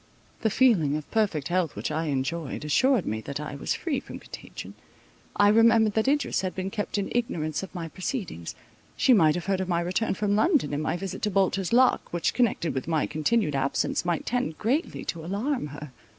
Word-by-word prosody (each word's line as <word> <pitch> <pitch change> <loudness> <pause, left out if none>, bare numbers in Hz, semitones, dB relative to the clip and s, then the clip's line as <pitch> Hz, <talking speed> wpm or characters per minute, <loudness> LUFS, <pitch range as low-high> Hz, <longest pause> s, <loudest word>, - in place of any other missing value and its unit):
The 220 - +2
feeling 205 - +3
of 155 - -9
perfect 195 -10 0
health 175 -3 0
which - - -3
I 160 +2 -1
enjoyed, 150 +1 -2
assured 255 - +3
me 110 +1 -2
that 140 +4 -5
I 150 -1 -5
was 140 - -2
free 295 -7 -2
from - - -9
contagion. - - -10 0.6
I 205 0 +5
remembered 225 0 +5
that 220 +3 +1
Idris 290 -5 +1
had 185 -1 -3
been 190 +1 -3
kept 205 -1 -3
in 200 - -2
ignorance 160 -11 -1
of 190 0 -9
my 170 -2 -4
proceedings. 180 - -5 0.4
She 260 - +5
might 160 -8 +5
have 175 - -4
heard 195 -1 0
of 185 - -3
my 170 -1 +2
return 185 +5 -1
from 205 0 0
London, 300 - +2
and 145 - -1
my 165 - -1
visit 190 +1 -5
to 210 - +1
Bolter's 195 -1 +1
Lock, 250 +2 +3
which, 175 -1 0
connected 225 -9 +1
with 130 - -4
my 160 -2 +1
continued 155 +2 0
absence, 135 +2 0
might 175 -2 -1
tend 240 -10 -1
greatly 275 - -1
to 165 -1 -4
alarm 205 - -2
her. 145 0 -9
185 Hz, 205 wpm, -26 LUFS, 155-225 Hz, 0.6 s, I